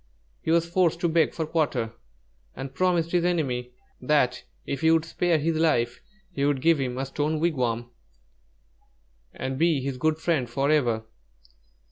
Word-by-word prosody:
He -, -, -5 dB
was 165 Hz, 0 st, +3 dB
forced 170 Hz, -1 st, +2 dB
to 175 Hz, -, +2 dB
beg 160 Hz, -1 st, +2 dB
for 160 Hz, -, -3 dB
quarter, 140 Hz, -8 st, -1 dB, 0.6 s
and 135 Hz, 0 st, -7 dB
promised 175 Hz, 0 st, +1 dB
his 175 Hz, -1 st, +2 dB
enemy 125 Hz, -8 st, -1 dB, 0.3 s
that 125 Hz, -2 st, +1 dB, 0.2 s
if 140 Hz, -, -4 dB
he 160 Hz, -, +4 dB
would 165 Hz, 0 st, +3 dB
spare 170 Hz, 0 st, +1 dB
his 160 Hz, +2 st, 0 dB
life, 120 Hz, -7 st, +1 dB, 0.3 s
he 140 Hz, -6 st, -3 dB
would 145 Hz, -1 st, +2 dB
give 165 Hz, +2 st, +3 dB
him 125 Hz, -2 st, -2 dB
a 135 Hz, -, -1 dB
stone 150 Hz, +3 st, -1 dB
wigwam 125 Hz, -8 st, -1 dB, 1.4 s
and 130 Hz, 0 st, -4 dB
be 165 Hz, -3 st, +3 dB
his 130 Hz, -1 st, -4 dB
good 155 Hz, +2 st, +1 dB
friend 160 Hz, -7 st, 0 dB
forever. 135 Hz, -4 st, +1 dB
150 Hz, 155 wpm, -26 LUFS, 130-165 Hz, 1.4 s, he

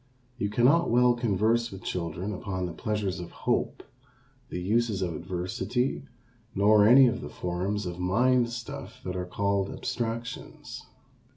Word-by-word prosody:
You 105 Hz, -, 0 dB
cannot 130 Hz, +10 st, +4 dB
well 125 Hz, +1 st, +5 dB
converse 115 Hz, 0 st, +1 dB
with 95 Hz, -2 st, -10 dB
children 90 Hz, +3 st, -3 dB
upon 95 Hz, -1 st, -3 dB
the 90 Hz, -, -4 dB
pleasures 105 Hz, -2 st, -2 dB
of 85 Hz, -, -7 dB, 0.2 s
hope, -, -, 0 dB, 0.7 s
the 90 Hz, -, -4 dB
uses 105 Hz, +1 st, +1 dB
of 85 Hz, -3 st, -2 dB
adversity, 95 Hz, -, -2 dB, 0.5 s
nor 105 Hz, +1 st, +5 dB
any 130 Hz, +3 st, +8 dB
of 120 Hz, 0 st, 0 dB
the -, -, -6 dB
forms 95 Hz, +4 st, -3 dB
of 90 Hz, 0 st, -5 dB
mind 120 Hz, +7 st, +3 dB
stuff 120 Hz, 0 st, -8 dB
that 90 Hz, 0 st, -3 dB
are 90 Hz, -1 st, -3 dB
called 100 Hz, +1 st, 0 dB
abstractions. 115 Hz, 0 st, -5 dB
105 Hz, 145 wpm, -28 LUFS, 90-120 Hz, 0.7 s, any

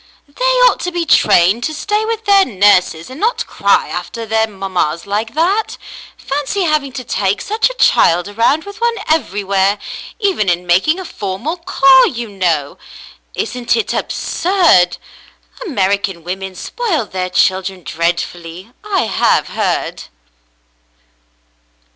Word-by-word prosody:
"They 300 Hz, +13 st, -4 dB, 0.2 s
ought -, -, +3 dB
to 360 Hz, -, -3 dB
be 345 Hz, -1 st, -2 dB
trained 200 Hz, -, +4 dB
to 310 Hz, -, -3 dB
stay 420 Hz, +7 st, -1 dB
with 450 Hz, 0 st, -3 dB
their 400 Hz, -1 st, +5 dB
nurses 190 Hz, -, +2 dB
and 265 Hz, -, -9 dB
not 455 Hz, +5 st, 0 dB
cry -, -, +1 dB
after 230 Hz, -1 st, -6 dB
their 220 Hz, 0 st, +1 dB
mammas 190 Hz, -6 st, -3 dB
like 215 Hz, +4 st, -3 dB
that. 380 Hz, +7 st, 0 dB, 0.4 s
Fancy 290 Hz, +8 st, -2 dB
having 305 Hz, -4 st, 0 dB
to 255 Hz, -, -6 dB
take 200 Hz, -4 st, -1 dB
such 435 Hz, +4 st, 0 dB
a -, -, -8 dB
child 175 Hz, -, +3 dB
around 230 Hz, +9 st, +1 dB
with 405 Hz, +4 st, -11 dB
one 470 Hz, 0 st, +1 dB
everywhere, 200 Hz, -9 st, +1 dB, 0.4 s
even 385 Hz, -, 0 dB
in 175 Hz, 0 st, 0 dB
making 190 Hz, -, +2 dB
a 375 Hz, -, -6 dB
formal 205 Hz, -, -4 dB
call, 275 Hz, -7 st, +5 dB
you 240 Hz, -2 st, -5 dB
know! 170 Hz, -8 st, -1 dB, 0.6 s
Isn't 245 Hz, -1 st, -1 dB
it 455 Hz, -, -1 dB
absurd? 340 Hz, -, +2 dB, 0.7 s
American 195 Hz, -, -1 dB
women 190 Hz, +2 st, -6 dB
spoil 330 Hz, -, -2 dB
their 185 Hz, -2 st, -4 dB
children 185 Hz, 0 st, 0 dB
dreadfully, 170 Hz, +4 st, -4 dB
I 405 Hz, -3 st, 0 dB
have 225 Hz, -, +1 dB
heard." -, -, -2 dB
225 Hz, 135 wpm, -16 LUFS, -, 0.7 s, their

